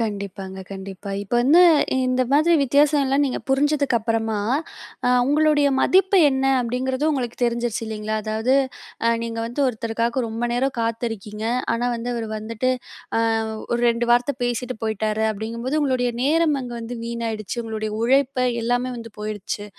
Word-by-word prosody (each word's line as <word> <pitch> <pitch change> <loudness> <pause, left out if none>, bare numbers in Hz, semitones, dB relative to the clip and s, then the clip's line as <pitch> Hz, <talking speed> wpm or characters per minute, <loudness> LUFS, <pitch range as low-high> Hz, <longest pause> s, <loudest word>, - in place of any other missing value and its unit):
கண்டிப்பாங்க, 200 -3 -4
கண்டிப்பா. 195 0 -7
இப்ப 205 +4 -4
வந்து 320 +8 +6 0.4
இந்த 255 0 +2
மாதிரி 310 +4 +4
வித்தியாசம் 285 +2 +3
எல்லாம் 275 +2 +2
நீங்கப் 260 - -4
புரிஞ்சதுக்கப்றமா, 235 -6 +1 0.7
அ - - +4 0.2
உங்களோடயே 295 0 +3
மதிப்பு 380 +1 +4
என்ன 265 0 -1 0.2
அப்டிங்கறது 255 +4 -2
உங்களுக்குத் 245 -4 -3
தெரிஞ்சுருச்சு 235 -1 -1
இல்லீங்களா? 215 0 -3
அதாது 220 +4 0 0.7
நீங்க 230 0 -4
வந்து 240 +5 -4
ஒருத்தருக்காக 230 +1 -1
ரொம்ப 225 +2 -3
நேரம் 260 +3 0
காத்திருக்கீங்க. 225 -2 -3 0.3
ஆனா 235 +1 -1
வந்து 230 +1 -5
அவரு 230 -1 -3
வந்துட்டு 225 +4 -2 0.5
அ - - +3 0.5
ஒரு 240 - +1
ரெண்டு 235 +1 -1
வார்த்த 245 +4 +3
பேசிட்டு 245 +1 -2
போயிட்டாரு 220 0 -1
அப்டிங்கும்போது 230 +7 -3
உங்களுடைய 255 -3 +1
நேரம் 310 +1 +3
அங்க 245 -1 -7
வந்து 230 +2 -6
வீணாயிடுச்சு. 230 -2 -4
உங்களோட 220 -1 -4 0.2
உழைப்ப 270 +2 +2 0.2
எல்லாமே 245 +2 0
வந்து 230 -1 -8
போயிருச்சு. 210 0 -4
235 Hz, 140 wpm, -22 LUFS, 220-265 Hz, 0.7 s, வந்து